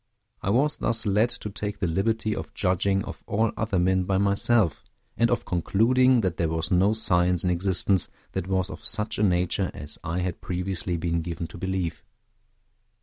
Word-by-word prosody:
I -, -, -2 dB
was 140 Hz, +8 st, +2 dB
thus 115 Hz, -2 st, 0 dB
led 105 Hz, +4 st, +3 dB
to 120 Hz, -4 st, -5 dB
take 105 Hz, +1 st, -4 dB
the 95 Hz, -, -1 dB
liberty 105 Hz, +5 st, 0 dB
of -, -, -7 dB
judging 95 Hz, +2 st, +1 dB
of -, -, -8 dB
all 110 Hz, +2 st, +1 dB
other 105 Hz, -3 st, -1 dB
men 90 Hz, +1 st, +2 dB
by 95 Hz, 0 st, +1 dB
myself, 100 Hz, -2 st, +2 dB, 0.3 s
and 115 Hz, 0 st, +2 dB
of 120 Hz, -, 0 dB
concluding 120 Hz, +8 st, +3 dB
that 95 Hz, -5 st, -1 dB
there 80 Hz, -, 0 dB
was 80 Hz, 0 st, -2 dB
no 95 Hz, +4 st, +4 dB
science 90 Hz, -5 st, +2 dB
in 90 Hz, -, +1 dB
existence 95 Hz, 0 st, +2 dB, 0.2 s
that 90 Hz, -, -3 dB
was 95 Hz, 0 st, 0 dB
of -, -, -9 dB
such 105 Hz, -1 st, -1 dB
a -, -, +2 dB
nature 90 Hz, 0 st, +1 dB
as 75 Hz, +1 st, -6 dB
I 85 Hz, +3 st, -2 dB
had 90 Hz, -1 st, -3 dB
previously 90 Hz, -1 st, -3 dB
been 85 Hz, 0 st, -1 dB
given 85 Hz, +1 st, -5 dB
to -, -, -10 dB
believe. 90 Hz, -4 st, -3 dB
95 Hz, 185 wpm, -26 LUFS, 90-105 Hz, 0.3 s, no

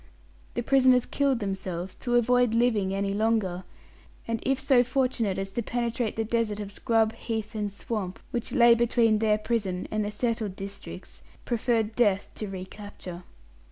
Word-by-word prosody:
The 240 Hz, -, -1 dB
prisoners 255 Hz, -1 st, +4 dB
killed 275 Hz, -4 st, +1 dB
themselves 190 Hz, -2 st, -4 dB
to 240 Hz, -1 st, -1 dB
avoid 245 Hz, -1 st, +3 dB
living 225 Hz, -5 st, +2 dB
any 195 Hz, 0 st, -1 dB
longer, 205 Hz, -4 st, 0 dB, 0.6 s
and 230 Hz, 0 st, -1 dB
if 270 Hz, 0 st, +1 dB
so 255 Hz, -3 st, +4 dB
fortunate 250 Hz, -5 st, 0 dB
as 195 Hz, 0 st, -3 dB
to 235 Hz, -, -2 dB
penetrate 235 Hz, 0 st, -2 dB
the 225 Hz, -, 0 dB
desert 225 Hz, -2 st, 0 dB
of 205 Hz, -1 st, -5 dB
scrub, 225 Hz, +1 st, +1 dB
heath, 220 Hz, -1 st, -4 dB
and 210 Hz, -2 st, -2 dB
swamp, 200 Hz, -2 st, -4 dB
which 240 Hz, -1 st, -3 dB
lay 235 Hz, -1 st, +7 dB
between 230 Hz, -2 st, +3 dB
their 215 Hz, -1 st, +3 dB
prison 205 Hz, -5 st, -2 dB
and 215 Hz, 0 st, 0 dB
the 205 Hz, -, -2 dB
settled 220 Hz, -2 st, -2 dB
districts, 200 Hz, +1 st, -9 dB, 0.2 s
preferred 225 Hz, -2 st, 0 dB
death 205 Hz, -5 st, +2 dB
to 215 Hz, -, -5 dB
recapture. 190 Hz, -1 st, -8 dB
220 Hz, 155 wpm, -27 LUFS, 200-240 Hz, 0.6 s, lay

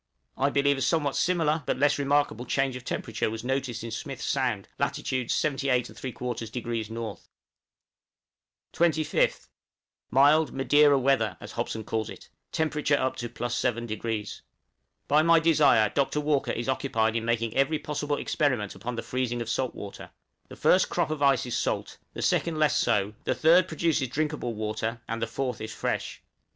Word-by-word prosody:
I 135 Hz, +2 st, +2 dB
believe 140 Hz, 0 st, +2 dB
a -, -, -4 dB
somewhat 145 Hz, -2 st, +1 dB
similar, 165 Hz, -3 st, +1 dB
but -, -, 0 dB
less 145 Hz, +2 st, +2 dB
remarkable, 140 Hz, -4 st, +1 dB
change 135 Hz, 0 st, 0 dB
of 125 Hz, -, -7 dB
temperature 115 Hz, -2 st, -2 dB
was 110 Hz, +1 st, -6 dB
noticed 130 Hz, -3 st, -2 dB
in 115 Hz, -, -6 dB
Smith's 135 Hz, +4 st, -5 dB
Sound, 125 Hz, -8 st, -1 dB
lat. -, -, 0 dB
78 130 Hz, -2 st, -3 dB
3/4° 125 Hz, -4 st, -2 dB
N. 115 Hz, -2 st, -5 dB, 1.6 s
25th. 160 Hz, -2 st, +1 dB, 0.6 s
Mild 145 Hz, +5 st, +4 dB
"Madeira 145 Hz, +1 st, +4 dB
weather," 125 Hz, -8 st, +1 dB
as -, -, -9 dB
Hobson 110 Hz, -, -3 dB
calls 110 Hz, 0 st, -2 dB
it, -, -, -11 dB, 0.2 s
temperature 150 Hz, -2 st, +1 dB
up 130 Hz, -1 st, -1 dB
to 120 Hz, -, -4 dB
+7°. 120 Hz, -3 st, -3 dB, 0.7 s
By 150 Hz, +2 st, +5 dB
my 165 Hz, +1 st, +5 dB
desire 155 Hz, -10 st, +4 dB
Dr. 140 Hz, +4 st, 0 dB
Walker 150 Hz, -2 st, +1 dB
is 120 Hz, -, -3 dB
occupied 115 Hz, -4 st, 0 dB
in 115 Hz, -, 0 dB
making 115 Hz, -1 st, 0 dB
every 135 Hz, +3 st, +2 dB
possible 145 Hz, -1 st, -2 dB
experiment 125 Hz, -, 0 dB
upon 115 Hz, +6 st, -5 dB
the 115 Hz, -, -4 dB
freezing 125 Hz, -2 st, -2 dB
of 115 Hz, -1 st, -3 dB
salt 130 Hz, +1 st, -1 dB
water; 100 Hz, -1 st, -8 dB, 0.4 s
the -, -, -11 dB
first -, -, +3 dB
crop -, -, 0 dB
of 155 Hz, -2 st, -3 dB
ice 135 Hz, -2 st, +3 dB
is 120 Hz, -, -3 dB
salt, -, -, -2 dB, 0.2 s
the -, -, -4 dB
second 165 Hz, -2 st, +1 dB
less 155 Hz, -4 st, +3 dB
so, 105 Hz, -3 st, +1 dB
the -, -, +1 dB
third 170 Hz, +3 st, +5 dB
produces 160 Hz, -4 st, 0 dB
drinkable 145 Hz, -3 st, -2 dB
water, 110 Hz, +2 st, -3 dB
and 115 Hz, 0 st, -3 dB
the 115 Hz, -, 0 dB
fourth 125 Hz, -1 st, -3 dB
is 110 Hz, 0 st, -5 dB
fresh. -, -, -3 dB
130 Hz, 160 wpm, -27 LUFS, 115-145 Hz, 1.6 s, By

